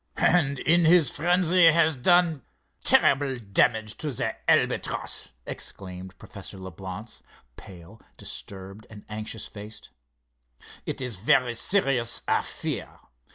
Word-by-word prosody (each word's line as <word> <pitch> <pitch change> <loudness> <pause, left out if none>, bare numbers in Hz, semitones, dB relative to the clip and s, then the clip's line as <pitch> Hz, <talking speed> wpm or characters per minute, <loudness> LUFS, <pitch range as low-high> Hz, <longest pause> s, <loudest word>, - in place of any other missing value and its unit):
"And 145 -6 +2
in 170 +5 +3
his 165 -2 +5
frenzy 175 +2 +3
has 160 -1 +4
done 170 +2 +3 0.4
terrible 140 -1 +3
damage 110 0 0
to 150 - -3
the 110 -2 -2
Albatross," - - 0 0.2
exclaimed 95 -1 -6
Professor - - -10
Leblance, 95 +4 -9 0.3
pale, 90 +4 -14 0.2
disturbed 100 +2 -8
and 105 -2 -13
anxious 110 +1 -6
faced. 105 +1 -11 1.0
"It - - -3
is 125 -6 -3
very 120 +5 +2
serious, 125 - +1
I - - +2
fear. - - -5
120 Hz, 110 wpm, -26 LUFS, 100-160 Hz, 1.0 s, his